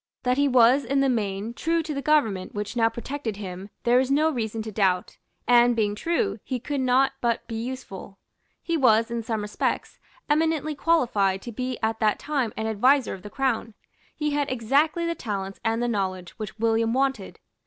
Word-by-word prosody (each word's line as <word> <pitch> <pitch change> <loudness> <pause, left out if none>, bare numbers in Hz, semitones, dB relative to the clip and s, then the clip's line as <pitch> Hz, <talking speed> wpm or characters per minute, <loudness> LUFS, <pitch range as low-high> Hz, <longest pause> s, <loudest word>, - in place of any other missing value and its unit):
That 250 +1 +1
he 285 - +4
was 255 +1 +5
in 275 +3 0
the 275 - +3
main 210 -2 -2
true 330 +6 0
to 310 -1 -4
the 280 - -3
government 225 -13 +1
which 205 +3 -4
now 225 -1 +3
protected 235 -2 -5
him 190 -1 -7
there 240 +1 +4
is 260 0 0
no 305 +3 +3
reason 225 -4 -3
to 220 - -6
doubt; 190 -3 0 0.3
and, 240 0 +5
being 210 -2 +1
true, 340 - -1
he 255 - -3
could 280 +3 -3
not 260 +1 +3
but 235 -1 0
be 230 - -8
useful. 225 -5 -6 0.5
He 335 - -1
was, 230 -5 +3
in 235 -1 -2
some 220 -2 -3
respects, 210 - -2 0.3
eminently 310 0 +1
qualified 235 - +1
to 240 - -6
be 255 +2 -3
at 220 0 0
that 215 -1 +2
time 275 -7 -1
an 220 - -2
adviser 245 +4 +3
of 190 - -8
the 210 - -9
Crown. 235 -3 -1 0.4
He 300 -1 -1
had 290 -1 -1
exactly 280 +8 +1
the 335 - 0
talents 195 -8 -5
and 225 +1 0
the - - +1
knowledge 190 -5 -2
which 215 0 -6
William 225 0 +1
wanted. 270 +1 -1
235 Hz, 195 wpm, -25 LUFS, 215-275 Hz, 0.5 s, was